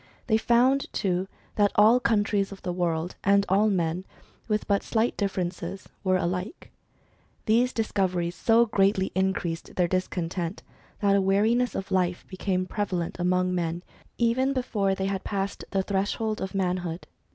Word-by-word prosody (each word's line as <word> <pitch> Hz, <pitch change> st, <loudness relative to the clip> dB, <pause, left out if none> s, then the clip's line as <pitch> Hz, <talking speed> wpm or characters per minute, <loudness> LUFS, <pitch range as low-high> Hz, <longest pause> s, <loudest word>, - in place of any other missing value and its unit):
They 220 Hz, -3 st, +3 dB
found 260 Hz, +6 st, +3 dB
too, 185 Hz, -1 st, 0 dB, 0.3 s
that 205 Hz, -1 st, +4 dB
all 220 Hz, +4 st, +6 dB
countries 205 Hz, -4 st, +1 dB
of 195 Hz, -, -10 dB
the 180 Hz, -, -2 dB
world, 175 Hz, -1 st, -1 dB
and 200 Hz, 0 st, +4 dB
all 200 Hz, +3 st, +3 dB
men, 175 Hz, -2 st, 0 dB, 0.4 s
with 215 Hz, -1 st, -1 dB
but 200 Hz, -1 st, +2 dB
slight 225 Hz, +1 st, 0 dB
differences, 190 Hz, -1 st, -3 dB, 0.2 s
were 185 Hz, -1 st, +3 dB
alike. 180 Hz, -, -4 dB, 0.7 s
These 240 Hz, +3 st, +3 dB
discoveries 185 Hz, -6 st, -1 dB
so 225 Hz, +6 st, +4 dB
greatly 195 Hz, -3 st, +2 dB
increased 185 Hz, -3 st, -2 dB
their 180 Hz, -1 st, +2 dB
discontent, 180 Hz, -1 st, -2 dB, 0.4 s
that 200 Hz, -1 st, +4 dB
a 200 Hz, -, +3 dB
weariness 220 Hz, +6 st, +2 dB
of 195 Hz, -, -4 dB
life 180 Hz, -1 st, 0 dB
became 185 Hz, -1 st, -2 dB
prevalent 185 Hz, -4 st, -3 dB
among 180 Hz, +1 st, +1 dB
men 170 Hz, 0 st, -2 dB, 0.3 s
even 250 Hz, +3 st, +2 dB
before 210 Hz, -7 st, 0 dB
they 190 Hz, -, -2 dB
had 195 Hz, 0 st, -2 dB
passed 200 Hz, -1 st, -3 dB
the 195 Hz, -1 st, 0 dB
threshold 205 Hz, +3 st, -1 dB
of 190 Hz, 0 st, -4 dB
manhood. 180 Hz, -2 st, -2 dB
195 Hz, 150 wpm, -26 LUFS, 180-215 Hz, 0.7 s, all